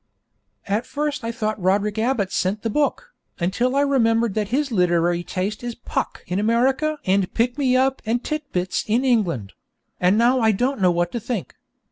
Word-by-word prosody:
At 210 +5 -1
first 295 -2 -2
I 230 - -2
thought 215 -2 -3
Roderick 205 +3 +1
Abbott 220 -5 0
sent 200 +3 -1
the 225 - -1
book, 300 - -1 0.2
until 240 +9 0
I 280 - +4
remembered 230 -6 +2
that 210 -1 -1
his 275 +5 -1
literary 175 -3 +2
taste 200 +6 -3
is 240 -1 -4
Puck 245 - -4
in 180 +2 -2
America 260 +8 +1
and 190 0 +1
Pick 245 +2 +1
me 260 -3 +2
up 265 +1 +1
and 235 +2 -1
Tit 305 -2 -4
Bits 180 0 -1
in 235 +5 +1
England; 175 - 0 0.5
and 180 +3 +3
now 245 +3 +4
I 220 -2 +3
don't 250 +3 -1
know 185 - +5
what 175 0 0
to 235 - -3
think. 230 -4 -4
225 Hz, 185 wpm, -22 LUFS, 190-255 Hz, 0.5 s, know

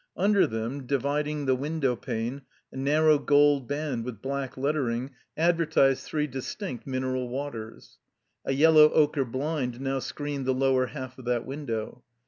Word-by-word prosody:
Under 200 +2 +4
them, 115 +4 -4
dividing 145 +2 -1
the 130 - +3
window 140 -1 -1
pane, 120 +2 -4 0.3
a - - -14
narrow 150 +3 +3
gold 145 -3 +4
band 145 -5 -2
with 120 -4 -6
black 135 +1 -4
lettering 135 -2 -1 0.3
advertised 160 -5 +2
three 150 -1 0
distinct 135 - -6
mineral 130 -1 -2
waters. 120 -4 -7 0.4
A - - -1
yellow 155 +2 +7
ochre 145 -3 +3
blind 130 -1 -3
now 135 0 -1
screened 145 0 -4
the 130 - +2
lower 130 -1 +2
half 130 -2 -8
of 130 - -11
that 120 -1 0
window. 125 -4 -5
135 Hz, 145 wpm, -27 LUFS, 125-150 Hz, 0.4 s, yellow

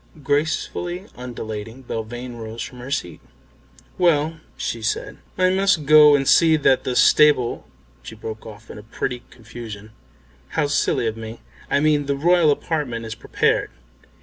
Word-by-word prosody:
Gracefully 160 +5 -1
undulating, 115 -1 -7
Belvane 120 +1 -6
rose 115 0 -6
from 125 - -10
her 125 +2 -8
seat. 90 -10 -4 0.8
"Well," 160 -2 +2 0.2
she 115 - -4
said, 110 - -3 0.2
"I 185 0 +3
must 190 -5 +2
go 150 0 +8
and 135 -1 0
see 160 -1 +5
that 135 -3 +2
the 125 - -2
stable 130 0 +4 0.2
" - - -33
she 85 - -10
broke 110 0 -8
off 110 0 -12
in - - -9
a - - -10
pretty 120 +3 -4
confusion 110 -2 -10 0.7
"How 155 - +3
silly 145 -4 0
of 110 0 -2
me, 110 +1 -8 0.3
I - - +2
mean 150 -2 +2
the 140 - 0
Royal 170 +1 +4
Apartment 145 -6 -2
is 110 - -5
prepared. 115 - 0
125 Hz, 155 wpm, -22 LUFS, 115-150 Hz, 0.8 s, go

